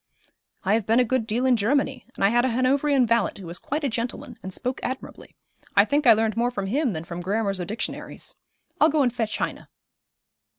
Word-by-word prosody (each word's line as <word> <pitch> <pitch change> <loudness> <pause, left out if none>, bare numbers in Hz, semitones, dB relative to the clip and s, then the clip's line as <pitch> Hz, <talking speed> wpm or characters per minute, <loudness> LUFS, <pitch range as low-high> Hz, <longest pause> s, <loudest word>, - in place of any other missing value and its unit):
'I 195 - +2
have 220 -2 +1
been 225 +2 +4
a - - +6
good 250 -2 0
deal 235 +4 0
in 255 -1 +5
Germany, 265 +4 0
and - - -3
I - - +5
had 240 +2 +3
a 260 - +2
Hanoverian 265 +2 +2
valet 230 -2 +2
who 195 - -9
was 170 +1 -4
quite 300 +3 -3
a - - +2
gentleman, 245 +2 -4
and 190 - -6
spoke 250 +7 -3
admirably. 260 +1 -6 0.4
I - - +7
think 290 -1 +1
I 230 - +10
learned 220 0 0
more 235 +1 +1
from 200 -5 -4
him 255 +3 0
than 160 -1 -4
from 170 +1 -6
grammars 195 0 -1
or - - -3
dictionaries. 215 +5 -4 0.5
I'll 310 - +6
go 300 -1 +2
and 245 -3 +1
fetch 225 -3 -2
Heine.' - - -4
235 Hz, 220 wpm, -25 LUFS, 210-260 Hz, 0.5 s, I